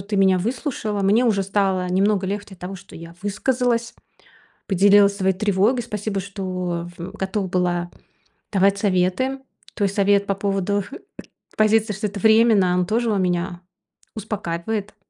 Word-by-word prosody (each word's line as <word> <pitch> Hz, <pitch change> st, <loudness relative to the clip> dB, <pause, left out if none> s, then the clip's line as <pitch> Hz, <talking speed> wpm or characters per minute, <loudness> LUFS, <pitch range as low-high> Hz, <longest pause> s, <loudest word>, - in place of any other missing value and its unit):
ты 205 Hz, -, 0 dB
меня 190 Hz, -1 st, +4 dB
выслушала. 220 Hz, -, -3 dB
Мне 205 Hz, +5 st, +3 dB
уже 210 Hz, -5 st, +2 dB
стало 190 Hz, -2 st, 0 dB
немного 195 Hz, +1 st, +1 dB
легче 205 Hz, +1 st, -4 dB
от 180 Hz, -, -24 dB
того, 185 Hz, +2 st, -6 dB
что 175 Hz, -, -15 dB
я 165 Hz, +1 st, -10 dB
высказалась, 235 Hz, +3 st, 0 dB, 0.7 s
поделилась 200 Hz, +1 st, +5 dB
своей 190 Hz, -1 st, +1 dB
тревогой. 205 Hz, +5 st, +1 dB
Спасибо, 210 Hz, -3 st, -4 dB
что 185 Hz, -3 st, -4 dB
в 175 Hz, +2 st, -7 dB
готова 190 Hz, 0 st, -3 dB
была 175 Hz, -1 st, -1 dB, 0.6 s
давать 195 Hz, 0 st, +3 dB
советы. 200 Hz, +7 st, 0 dB, 0.3 s
То 210 Hz, -, -2 dB
есть 195 Hz, -1 st, +1 dB
совет 200 Hz, 0 st, +3 dB
по 200 Hz, -, 0 dB
поводу, 195 Hz, 0 st, -1 dB
э, -, -, -7 dB, 0.6 s
к -, -, -25 dB
позиции, 215 Hz, 0 st, +3 dB
что 210 Hz, +2 st, -2 dB
это 200 Hz, 0 st, -7 dB
временно, 220 Hz, -3 st, +4 dB
он 180 Hz, -1 st, +1 dB
тоже 230 Hz, +1 st, 0 dB
он 200 Hz, -2 st, +1 dB
меня 175 Hz, 0 st, -1 dB, 0.5 s
успокаивает, 210 Hz, -1 st, -4 dB
200 Hz, 155 wpm, -22 LUFS, 185-215 Hz, 0.7 s, поделилась